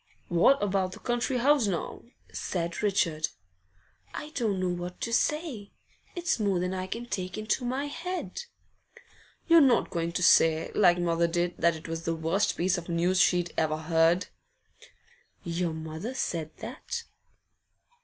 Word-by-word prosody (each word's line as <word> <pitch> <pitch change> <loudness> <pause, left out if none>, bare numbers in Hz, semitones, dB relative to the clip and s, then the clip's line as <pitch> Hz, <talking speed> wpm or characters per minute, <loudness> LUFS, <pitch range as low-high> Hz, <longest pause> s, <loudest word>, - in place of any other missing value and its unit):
'What 180 +10 +4
about 190 -2 0
the - - -10
country 240 +1 -1
house 270 -2 +3
now?' 175 -5 -3 0.3
said 170 -2 -3
Richard. 170 -7 +1 0.9
'I 300 - -6
don't 220 -10 -1
know 185 -1 0
what 175 0 -5
to 230 - -2
say. 280 -7 -1 0.4
It's 350 -7 0
more 200 -3 +1
than 180 +1 -1
I 185 0 -3
can 230 +5 -5
take 185 -5 -4
into 215 +3 -1
my 260 +3 -1
head.' 360 +9 -5 1.1
'You're 335 -1 +7
not 260 -4 +3
going 170 -2 -1
to 180 - -1
say, 160 -1 +4
like 175 -4 +5
mother 170 -1 +1
did, 175 +1 0
that 170 0 +3
it 160 - -9
was 165 0 -4
the 165 0 -2
worst 165 +6 0
piece 180 +1 +1
of 170 - -11
news 175 +2 +2
she'd 175 -2 +2
ever 155 -1 +1
heard?' 165 +3 +2 1.2
'Your 170 0 -1
mother 160 +10 -6
said 165 -10 -2
that? 470 0 -5
180 Hz, 155 wpm, -28 LUFS, 170-235 Hz, 1.2 s, You're